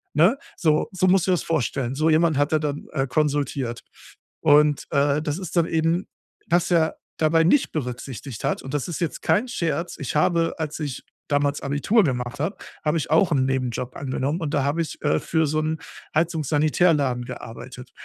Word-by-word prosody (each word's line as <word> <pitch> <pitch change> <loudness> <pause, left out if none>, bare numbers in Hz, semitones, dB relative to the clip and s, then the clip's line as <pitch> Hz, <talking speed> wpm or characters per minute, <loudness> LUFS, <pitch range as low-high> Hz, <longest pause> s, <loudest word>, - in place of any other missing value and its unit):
Ne, 175 - +5 0.2
so 155 -4 +1
so 185 -1 0
musst 185 -1 +4
du - - +3
dir - - +5
das 180 - 0
vorstellen. 135 -5 -1
So 155 +3 +2
jemanden 160 -2 +3
hat 145 0 +2
er 155 - +3
dann, 150 -1 -3
äh, 135 -3 0
konsultiert 140 -4 -1 0.6
und, 150 -1 +4
äh, 140 +1 +2
das 150 -1 -2
ist 185 -4 -7
dann 170 -1 +4
eben 165 +3 0 0.4
was 175 +1 +2
er 165 -2 +2 0.2
dabei 165 +1 +4
nicht 260 - +3
berücksichtigt 125 -3 -5
hat, - - 0
und 135 - -7
das 145 - -1
ist 170 - -4
jetzt 170 - -2
kein 215 +5 +2
Scherz 170 - -2
ich 140 - -4
habe 165 +2 +2
als 155 -1 -3
ich 145 -5 -4 0.3
damals 145 0 +1
Abitur 145 +11 +2
gemacht 125 0 -2
habe, 160 +8 -1 0.3
habe 150 +2 +2
ich 155 - -3
auch 165 +3 +4
'n 135 -4 +3
Nebenjob 130 -2 -2
angenommen, 140 +3 -2
und 150 -3 -3
da 140 - +2
habe 145 +4 0
ich, 155 - -8
äh, 80 - +2
für 160 -1 0
so 155 +2 0
'n 155 0 -2 0.4
Heizungssanitärladen 155 -4 +2
gearbeitet. 125 +1 -9
150 Hz, 190 wpm, -24 LUFS, 135-165 Hz, 0.6 s, Ne